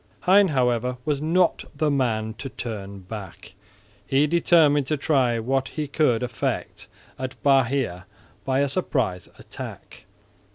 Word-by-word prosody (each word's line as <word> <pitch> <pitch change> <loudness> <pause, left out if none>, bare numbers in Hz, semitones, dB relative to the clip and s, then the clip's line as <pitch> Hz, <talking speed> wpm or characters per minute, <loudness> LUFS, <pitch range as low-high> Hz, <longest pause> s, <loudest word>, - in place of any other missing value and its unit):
Hein 195 +2 +5
however 125 -4 0
was 145 -2 0
not 170 +3 +2
the 150 +1 +1
man 110 -5 0
to 135 - -5
turn 100 -6 -7
back. 95 -1 -9 0.5
He 135 +2 +2
determined 150 -3 +3
to 155 - 0
try 135 -5 +2
what 130 +3 0
he 150 +2 -4
could 130 -5 +1
effect 125 -2 -3 0.3
at 130 -2 -5
Bahia 130 -9 +1 0.4
by 135 0 +1
a 140 - +2
surprise 130 - -1
attack. - - -10
130 Hz, 130 wpm, -24 LUFS, 115-150 Hz, 0.5 s, Hein